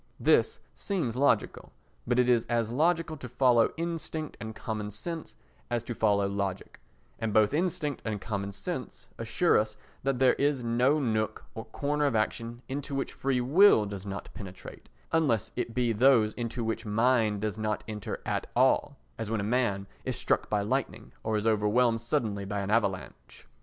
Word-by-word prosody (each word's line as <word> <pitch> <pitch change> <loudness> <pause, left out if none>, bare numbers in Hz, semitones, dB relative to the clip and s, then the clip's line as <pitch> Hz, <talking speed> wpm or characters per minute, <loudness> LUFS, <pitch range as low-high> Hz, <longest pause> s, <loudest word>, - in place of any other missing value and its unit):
This - - +3
seems 170 - -2
logical, 140 +3 +1 0.4
but 120 +1 +1
it 125 -1 +4
is 120 -2 +4
as 115 -2 0
logical 165 +4 +1
to 125 -3 -8
follow 125 -2 +4
instinct 165 -2 -4
and 110 -1 -6
common 110 -2 -4
sense 160 - -6 0.3
as 120 -1 -1
to 120 - -4
follow 100 -3 +2
logic, 100 -1 -4 0.4
and 115 -1 -1
both 105 +3 +4
instinct 155 -4 -1
and 110 -2 -3
common 100 -1 -3
sense 125 - -6
assure 115 +10 +3
us 110 0 -3 0.2
that 135 -1 0
there 130 0 +5
is 140 -3 +1
no 125 +6 +2
nook 110 -5 -1
or 110 - -7
corner 145 +6 -1
of 140 -5 +1
action 115 +2 -2
into 140 +1 -4
which 135 - -2
free 130 -2 0
will 140 - +6
does 100 -2 -6
not 100 0 -6
penetrate, 95 -3 -10 0.2
unless 145 - +1
it 120 -2 -3
be 120 -2 +2
those 115 -2 +4
into 120 0 -4
which 115 0 -2
mind 110 -1 +2
does 110 0 -2
not 105 -1 -1
enter 105 -2 -5
at - - -2
all, 130 +3 +3 0.2
as 110 -2 -3
when 115 -1 0
a - - -1
man 105 -3 0 0.2
is - - -2
struck - - 0
by 105 -1 +1
lightning 105 - -2
or 110 -1 0
is 105 - -2
overwhelmed 115 +2 +2
suddenly 110 -3 -1
by 100 +1 -3
an 100 +1 -3
avalanche. 95 - -2
115 Hz, 175 wpm, -29 LUFS, 105-130 Hz, 0.4 s, will